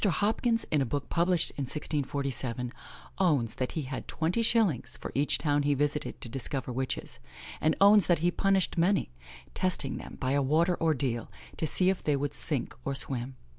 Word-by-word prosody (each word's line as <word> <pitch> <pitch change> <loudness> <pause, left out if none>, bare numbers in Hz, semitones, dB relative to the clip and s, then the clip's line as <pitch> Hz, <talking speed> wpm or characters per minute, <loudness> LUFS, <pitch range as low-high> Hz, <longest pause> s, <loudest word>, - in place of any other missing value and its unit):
Hopkins, 220 +4 +1
in 150 - +3
a - - +1
book 140 +5 -3
published 175 0 +2
in 140 - -2
1647, 135 -4 -1 0.5
owns 145 - +2
that 130 - -3
he 160 - -2
had 130 0 -6
twenty 170 +8 -1
shillings 215 - +1
for - - -7
each 145 +2 +3
town 145 -2 +1
he 145 0 +2
visited 145 +1 -1
to - - -5
discover 130 +1 -4
witches, 130 +1 -3 0.4
and 155 0 +2
owns 200 -1 +6
that 175 - +4
he 175 +3 +1
punished 195 -2 +1
many: 180 - +2 0.4
testing 165 -7 -1
them - - -9
by 130 -1 -1
a 140 +1 +2
water 160 +6 +2
ordeal, 135 -7 0 0.3
to 160 - -1
see 185 +5 +4
if 190 - -5
they 150 - +2
would 140 +1 -2
sink 145 -2 +1
or 140 - -2
swim. 130 -1 -2
145 Hz, 180 wpm, -29 LUFS, 135-175 Hz, 0.5 s, owns